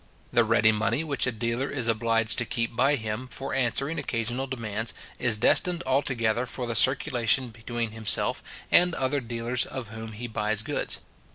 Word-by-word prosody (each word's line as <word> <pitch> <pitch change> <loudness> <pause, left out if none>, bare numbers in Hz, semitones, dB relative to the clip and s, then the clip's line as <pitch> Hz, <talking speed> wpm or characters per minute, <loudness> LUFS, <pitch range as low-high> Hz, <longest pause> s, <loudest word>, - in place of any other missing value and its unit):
The 120 - +4
ready 110 0 +3
money 110 +6 0
which 140 -5 +1
a - - +1
dealer 115 +4 -3
is 130 -5 0
obliged 115 0 +2
to 120 - 0
keep 115 0 -2
by 135 +4 +3
him, 110 +1 -4
for 135 +2 -2
answering 135 +5 0
occasional 120 0 -3
demands, 115 -3 -3 0.2
is 120 -4 +4
destined 170 +9 +4
altogether 125 -3 0
for 125 - -4
the 120 - -3
circulation 120 +3 +3
between 115 0 -5
himself 110 -1 +1 0.3
and 180 -1 +4
other 135 +2 0
dealers 120 0 -1
of 130 -5 -7
whom 110 0 -8
he 115 +3 -7
buys 110 -2 -1
goods. - - -1
120 Hz, 170 wpm, -26 LUFS, 110-130 Hz, 0.3 s, The